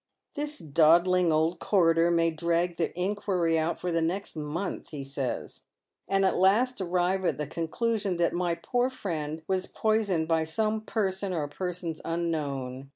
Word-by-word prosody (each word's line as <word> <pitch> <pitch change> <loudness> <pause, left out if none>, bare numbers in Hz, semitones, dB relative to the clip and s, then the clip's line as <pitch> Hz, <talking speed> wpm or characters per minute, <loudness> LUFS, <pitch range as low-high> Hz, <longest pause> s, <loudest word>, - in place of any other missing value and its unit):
" - - -58
This 295 +1 -4
dawdling 170 - +4
old 160 +2 +1
coroner 165 -4 +3
may 165 -1 +3
drag 170 +2 0
the 165 - 0
inquiry 180 -4 +1
out 160 +2 -1
for 180 - -2
the 165 0 +1
next 180 +5 -2
month," 155 +5 -4
he 145 -4 -6
says, 135 -2 -4 0.2
" - - -51
and 195 0 +3
at 190 - +2
last 215 +6 +3
arrive 180 +1 +1
at 180 - +1
the 150 - -2
conclusion 195 - -1
that 170 0 +1
my 175 -1 0
poor 245 +9 0
fiiend 160 - -4
was 190 -1 0
poisoned 210 -7 +1
by 160 -1 +2
some 215 +7 -1
person 195 -3 -2
or 155 -4 -1
persons 175 0 -5
unknown. 140 -6 -3
170 Hz, 165 wpm, -28 LUFS, 160-195 Hz, 0.2 s, dawdling